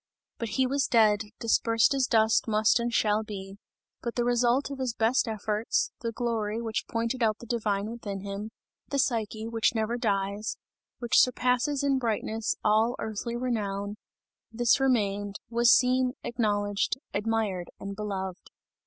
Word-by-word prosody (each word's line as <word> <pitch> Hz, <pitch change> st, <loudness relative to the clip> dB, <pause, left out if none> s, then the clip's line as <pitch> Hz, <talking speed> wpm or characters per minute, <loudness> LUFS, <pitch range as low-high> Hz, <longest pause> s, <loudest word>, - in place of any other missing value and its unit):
But 230 Hz, -, -3 dB
he 260 Hz, -, +4 dB
was 275 Hz, +1 st, +1 dB
dead, 215 Hz, -2 st, +4 dB
dispersed 230 Hz, +1 st, +3 dB
as 265 Hz, -2 st, +1 dB
dust 220 Hz, -1 st, +3 dB
must 215 Hz, +1 st, +3 dB
and 235 Hz, 0 st, -1 dB
shall 215 Hz, -2 st, +2 dB
be; 195 Hz, -2 st, -8 dB, 0.4 s
but 235 Hz, -, -4 dB
the 240 Hz, -, +1 dB
result 245 Hz, +3 st, +2 dB
of 275 Hz, -, -6 dB
his 250 Hz, -3 st, -2 dB
best 230 Hz, +3 st, +2 dB
efforts, 215 Hz, 0 st, -1 dB
the 230 Hz, -1 st, -2 dB
glory 225 Hz, -2 st, -2 dB
which 225 Hz, -1 st, -3 dB
pointed 230 Hz, +2 st, -2 dB
out 215 Hz, -2 st, +2 dB
the -, -, -11 dB
divine 210 Hz, -3 st, -1 dB
within 210 Hz, -4 st, -6 dB
him, 200 Hz, +2 st, -5 dB, 0.4 s
the 280 Hz, -, -2 dB
Psyche, 225 Hz, -4 st, -1 dB
which 230 Hz, 0 st, +1 dB
never 225 Hz, +2 st, -1 dB
dies, 200 Hz, -1 st, -1 dB, 0.4 s
which 240 Hz, -2 st, +3 dB
surpasses 250 Hz, +3 st, +2 dB
in 275 Hz, -1 st, +2 dB
brightness, 225 Hz, -2 st, -1 dB
all 220 Hz, +3 st, +3 dB
earthly 220 Hz, +2 st, -4 dB
renown, 205 Hz, -5 st, -2 dB, 0.6 s
this 240 Hz, +3 st, +3 dB
remained, 205 Hz, -6 st, +1 dB, 0.2 s
was 235 Hz, 0 st, +4 dB
seen, 255 Hz, 0 st, +4 dB
acknowledged, 205 Hz, -3 st, 0 dB, 0.2 s
admired 210 Hz, -4 st, -1 dB
and 200 Hz, 0 st, -6 dB
beloved. 190 Hz, -3 st, -5 dB
225 Hz, 150 wpm, -28 LUFS, 210-240 Hz, 0.6 s, he